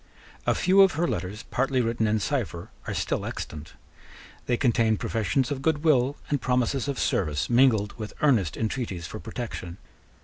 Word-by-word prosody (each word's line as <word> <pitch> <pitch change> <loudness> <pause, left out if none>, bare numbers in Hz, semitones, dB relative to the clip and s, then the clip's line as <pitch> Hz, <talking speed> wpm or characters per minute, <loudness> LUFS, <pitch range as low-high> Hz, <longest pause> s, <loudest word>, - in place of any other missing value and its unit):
A - - +3
few 190 +2 +5
of 190 -3 +6
her 170 +4 0
letters, 100 - -4
partly 135 +1 +1
written 115 -2 +1
in 110 +1 +2
cipher, 105 - -3 0.2
are - - -2
still - - -1
extant. 75 0 -6 0.7
They 120 - +2
contain 115 -4 +2
professions 120 +6 0
of 135 -2 -2
good 150 +1 +1
will 140 -3 +3
and 145 -3 +1
promises 125 +1 0
of 140 -2 -2
service 75 +1 0
mingled 120 -5 +4
with 105 -1 -6
earnest 110 - +3
intreaties 110 -6 -3
for 110 - -7
protection. 110 -7 -6
120 Hz, 165 wpm, -26 LUFS, 105-135 Hz, 0.7 s, of